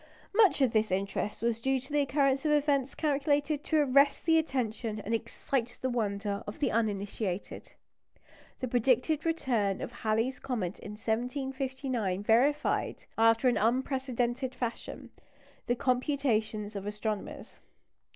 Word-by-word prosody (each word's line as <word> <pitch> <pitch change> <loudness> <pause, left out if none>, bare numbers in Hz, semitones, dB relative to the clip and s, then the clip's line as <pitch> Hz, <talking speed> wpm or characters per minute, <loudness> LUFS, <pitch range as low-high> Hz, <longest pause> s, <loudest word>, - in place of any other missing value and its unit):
Much 405 -8 +5
of 250 - +2
this 215 -1 +2
interest 200 +3 -2
was 230 -1 +1
due 265 +2 +1
to 270 +3 -10
the 295 - +3
occurrence 275 -1 +2
of 305 - +1
events 285 -2 +2
calculated 290 0 +1
to 315 - +1
arrest 280 -1 +4
the 325 -1 +5
attention 230 -7 -2
and 210 +2 -4
excite 230 +2 -2
the 260 - -1
wonder 205 -3 -2
of 205 - -6
the 290 - 0
uninitiated. 205 -3 -2 0.9
The 255 - -1
predicted 255 +6 +2
return 230 - 0
of - - -5
Halley's 230 +3 -1
comet 220 -9 -3
in 210 - -8
1759 250 -2 -2
verified, 270 +8 +2
after 225 +2 +4
an 245 - +3
unprecedented 255 +1 0
fashion, 240 -2 -5 0.6
the 240 - +2
computations 235 -5 0
of 200 0 -5
astronomers. 210 0 -4
245 Hz, 130 wpm, -30 LUFS, 220-275 Hz, 0.9 s, Much